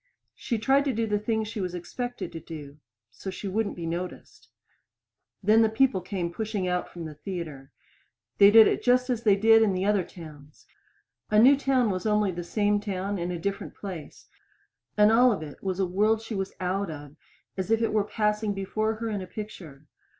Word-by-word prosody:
She 235 Hz, -, -3 dB
tried 270 Hz, +6 st, +3 dB
to 275 Hz, -, 0 dB
do 230 Hz, 0 st, 0 dB
the 210 Hz, -1 st, 0 dB
thing 220 Hz, +1 st, -1 dB
she 215 Hz, 0 st, -5 dB
was 180 Hz, -1 st, -3 dB
expected 245 Hz, +8 st, -5 dB
to 165 Hz, -, -7 dB
do 150 Hz, -3 st, -10 dB, 0.3 s
so 155 Hz, +10 st, -7 dB
she 190 Hz, +2 st, -6 dB
wouldn't 205 Hz, +2 st, -1 dB
be 170 Hz, -, -6 dB
noticed. 175 Hz, +2 st, -6 dB, 0.9 s
Then 215 Hz, +3 st, +5 dB
the 220 Hz, -, +4 dB
people 220 Hz, -3 st, +2 dB
came 180 Hz, -2 st, -4 dB
pushing 210 Hz, -2 st, -3 dB
out 180 Hz, 0 st, -1 dB
from 170 Hz, -2 st, -8 dB
the 155 Hz, -, -7 dB
theater. 150 Hz, -5 st, -7 dB, 0.7 s
They 200 Hz, -, +9 dB
did 220 Hz, +1 st, +9 dB
it -, -, 0 dB
just 250 Hz, +1 st, +2 dB
as 235 Hz, -2 st, -1 dB
they 210 Hz, -4 st, +4 dB
did 225 Hz, +2 st, +5 dB
it -, -, +6 dB
in 200 Hz, -, +1 dB
the 185 Hz, +1 st, -1 dB
other 205 Hz, -2 st, +2 dB
towns. 150 Hz, -4 st, -13 dB, 0.6 s
A 210 Hz, -, +2 dB
new 255 Hz, +6 st, +7 dB
town 265 Hz, -5 st, +1 dB
was 185 Hz, +3 st, -3 dB
only 210 Hz, -2 st, +2 dB
the 175 Hz, 0 st, -5 dB
same 205 Hz, +3 st, +1 dB
town 200 Hz, -1 st, -3 dB
in 175 Hz, +1 st, -2 dB
a 180 Hz, -, -3 dB
different 200 Hz, +4 st, -4 dB
place; 180 Hz, -7 st, -9 dB, 0.7 s
and 210 Hz, +1 st, +6 dB
all 245 Hz, +2 st, +6 dB
of 195 Hz, -7 st, -2 dB
it 145 Hz, -2 st, -10 dB
was 190 Hz, -1 st, -2 dB
a 190 Hz, -, +2 dB
world 210 Hz, +5 st, +2 dB
she 225 Hz, +1 st, -7 dB
was 195 Hz, -1 st, -2 dB
as -, -, -36 dB
out 190 Hz, +1 st, -1 dB
of 145 Hz, -2 st, -9 dB, 0.4 s
as 190 Hz, +1 st, -4 dB
if 225 Hz, 0 st, +3 dB
it 225 Hz, -, 0 dB
were 215 Hz, -1 st, +3 dB
passing 210 Hz, 0 st, -1 dB
before 215 Hz, +3 st, -1 dB
her 225 Hz, +1 st, -4 dB
in 205 Hz, -2 st, -3 dB
a 185 Hz, -, -7 dB
picture. 180 Hz, -9 st, -9 dB
200 Hz, 210 wpm, -27 LUFS, 180-220 Hz, 0.9 s, They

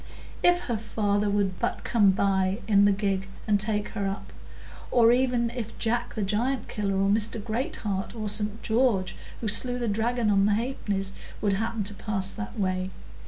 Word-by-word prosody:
If 355 Hz, 0 st, +4 dB
her 235 Hz, -9 st, -2 dB
father 205 Hz, -1 st, 0 dB
would 200 Hz, -2 st, 0 dB
but -, -, -2 dB
come 210 Hz, -4 st, +4 dB
by 190 Hz, 0 st, +2 dB
in 200 Hz, -2 st, +5 dB
the 205 Hz, -, +5 dB
gig 195 Hz, -1 st, -1 dB, 0.2 s
and 205 Hz, -1 st, +3 dB
take 210 Hz, 0 st, +1 dB
her 200 Hz, -3 st, -2 dB
up! 195 Hz, +1 st, -5 dB, 0.6 s
Or 235 Hz, -1 st, +5 dB
even 245 Hz, -2 st, +2 dB
if 235 Hz, -3 st, -6 dB
Jack 240 Hz, +1 st, -1 dB
the 215 Hz, -, -1 dB
Giantkiller, 210 Hz, -1 st, -1 dB
or 195 Hz, -, +2 dB
Mr 215 Hz, +2 st, +1 dB
Greatheart, 215 Hz, -3 st, -3 dB
or 215 Hz, -2 st, -3 dB
St 210 Hz, +1 st, 0 dB
George 220 Hz, -6 st, +1 dB, 0.3 s
who 225 Hz, -, -2 dB
slew 245 Hz, +4 st, +2 dB
the 240 Hz, -1 st, -2 dB
dragon 225 Hz, +1 st, +1 dB
on 195 Hz, 0 st, +4 dB
the 210 Hz, -, +3 dB
half 240 Hz, +5 st, -2 dB
pennies, 195 Hz, -1 st, -1 dB, 0.3 s
would 205 Hz, -2 st, +1 dB
happen 225 Hz, +2 st, -1 dB
to 200 Hz, +1 st, -4 dB
pass 195 Hz, -2 st, +1 dB
that 220 Hz, +1 st, -6 dB
way! 185 Hz, -1 st, 0 dB
210 Hz, 180 wpm, -27 LUFS, 195-230 Hz, 0.6 s, in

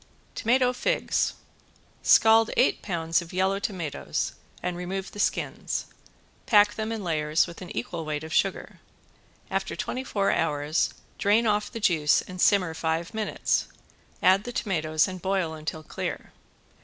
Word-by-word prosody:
~TOMATO 250 Hz, +2 st, +2 dB
FIGS~ -, -, 0 dB, 0.7 s
Scald 225 Hz, 0 st, +6 dB
eight 255 Hz, -, +3 dB
pounds 165 Hz, -3 st, 0 dB
of 170 Hz, -, -10 dB
yellow 190 Hz, +2 st, +1 dB
tomatoes 180 Hz, -8 st, -3 dB, 0.3 s
and 180 Hz, -1 st, -2 dB
remove 185 Hz, +2 st, -4 dB
the 205 Hz, -, -10 dB
skins. -, -, -1 dB, 0.6 s
Pack 210 Hz, -2 st, +5 dB
them 220 Hz, 0 st, -3 dB
in 225 Hz, -3 st, -3 dB
layers 155 Hz, -2 st, +1 dB
with 170 Hz, -, -10 dB
an 180 Hz, -, -8 dB
equal 165 Hz, +8 st, -3 dB
weight 155 Hz, -1 st, -3 dB
of 160 Hz, 0 st, -7 dB
sugar. -, -, 0 dB, 0.7 s
After -, -, -2 dB
twenty 260 Hz, -, -3 dB
four 200 Hz, -6 st, 0 dB
hours 150 Hz, 0 st, 0 dB, 0.3 s
drain 210 Hz, +4 st, +3 dB
off 210 Hz, -1 st, +1 dB
the 230 Hz, -, -5 dB
juice 160 Hz, -8 st, +3 dB
and 185 Hz, 0 st, -7 dB
simmer 185 Hz, -5 st, +4 dB
five 165 Hz, +3 st, -2 dB
minutes, 220 Hz, -1 st, 0 dB, 0.6 s
add 190 Hz, +2 st, +5 dB
the 245 Hz, -, -5 dB
tomatoes 155 Hz, -9 st, +1 dB
and 185 Hz, -1 st, -7 dB
boil 190 Hz, -4 st, 0 dB
until 155 Hz, 0 st, -5 dB
clear. -, -, -5 dB
185 Hz, 145 wpm, -26 LUFS, 160-210 Hz, 0.7 s, Scald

